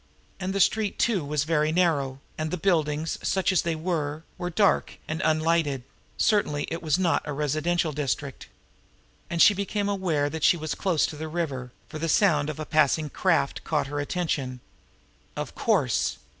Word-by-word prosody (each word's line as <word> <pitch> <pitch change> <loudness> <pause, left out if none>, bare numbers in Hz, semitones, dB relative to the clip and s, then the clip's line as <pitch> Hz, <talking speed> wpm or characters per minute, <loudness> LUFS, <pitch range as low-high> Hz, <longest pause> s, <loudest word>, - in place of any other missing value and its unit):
And 190 0 -2
the 195 - -1
street 210 +2 +2
too 210 -8 +1
was 145 0 -1
very 155 -1 +1
narrow, 145 -6 +1
and 155 0 -3
the 180 - -2
buildings, 160 -3 0
such 190 0 +1
as 185 - +3
they 170 -1 -1
were, 155 -2 -2
were 180 -1 -4
dark 200 +3 +2
and 160 +1 -3
unlighted 155 -4 +1 0.3
certainly 200 -9 +2
it 165 - -3
was 155 -2 +1
not 180 -3 +2
a 150 - -4
residential 155 +3 0
district! 140 -1 -3 0.8
And 170 - -2
now - - +9
she 210 - +7
became 200 +1 -2
aware 180 -8 0
that 160 +1 -5
she 175 - +5
was 155 -1 -3
close 180 -6 +1
to - - -5
the 160 +1 -5
river, 145 -7 -3 0.2
for 155 - -7
the 165 +1 -1
sound 155 -6 +3
of 155 - -5
a 155 - -3
passing 155 0 +2
craft 70 - +1
caught - - 0
her 145 +1 -4
attention. 145 -5 -2 0.8
Of - - -5
course! - - +1
155 Hz, 180 wpm, -26 LUFS, 150-180 Hz, 0.8 s, now